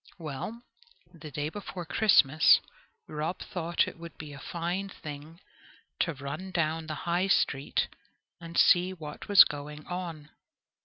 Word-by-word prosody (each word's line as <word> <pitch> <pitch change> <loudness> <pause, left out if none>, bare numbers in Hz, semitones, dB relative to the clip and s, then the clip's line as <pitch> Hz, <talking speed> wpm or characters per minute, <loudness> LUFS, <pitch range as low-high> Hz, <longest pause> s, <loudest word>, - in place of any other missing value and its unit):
Well, 165 - -6 0.5
the 160 -2 -10
day 145 +2 -3
before 185 -1 -7
Christmas, 160 -6 +5 0.5
Rob 155 +4 -3
thought 170 -1 -1
it - - -8
would 170 -1 -10
be 150 -2 -8
a 140 - -9
fine 175 +5 -3
thing 155 -1 -9 0.6
to 165 -3 0
run 140 +7 -6
down 165 -2 -1
the 155 - -3
High 175 +2 +1
Street 140 -7 +1 0.5
and 170 0 -7
see 180 +1 +5
what 150 -4 -9
was 205 -2 +10
going 150 +1 -7
on. 170 -4 -6
165 Hz, 140 wpm, -29 LUFS, 150-180 Hz, 0.6 s, was